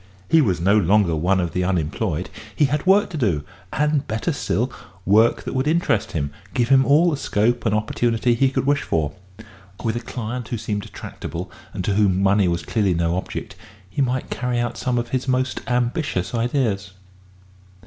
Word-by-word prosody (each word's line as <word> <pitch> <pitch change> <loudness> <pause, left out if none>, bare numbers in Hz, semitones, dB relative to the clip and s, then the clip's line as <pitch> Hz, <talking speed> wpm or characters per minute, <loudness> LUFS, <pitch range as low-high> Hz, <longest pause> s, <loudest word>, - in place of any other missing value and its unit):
He 165 - +5
was 95 - +1
no 100 +5 +4
longer 100 -2 +3
one 90 +5 +2
of 85 -2 -2
the 90 - 0
unemployed: 90 0 -1 0.2
he 150 - +4
had 145 +4 -1
work 200 +1 +4
to 165 - -4
do, 90 - +1 0.3
and, 150 -1 +1
better 110 0 -1
still, - - -1 0.3
work 110 +5 +4
that - - -5
would 130 +2 0
interest 160 - +1
him, 70 -3 -2 0.2
give 120 -1 +1
him 135 -1 +6
all 160 +5 +5
the 145 - -1
scope 120 -1 0
and 105 - +2
opportunity 115 +2 +1
he 130 +3 +3
could 135 - -1
wish 145 +1 +2
for. 75 -3 -1 0.7
With 115 -1 0
a - - -1
client 120 0 -5
who 120 - -3
seemed 105 -2 -4
tractable, - - -7 0.2
and 90 - -4
to 100 - +1
whom 100 -2 +3
money 100 0 +4
was 85 -1 -1
clearly 100 -6 +1
no 85 0 0
object, 95 - -5 0.3
he 95 +9 -3
might 130 -1 -1
carry 125 -1 -1
out 120 0 -1
some 125 -1 -1
of 120 0 -2
his 130 0 -2
most 130 0 0
ambitious 120 - -1
ideas. 115 -5 -1
115 Hz, 190 wpm, -22 LUFS, 95-130 Hz, 0.7 s, him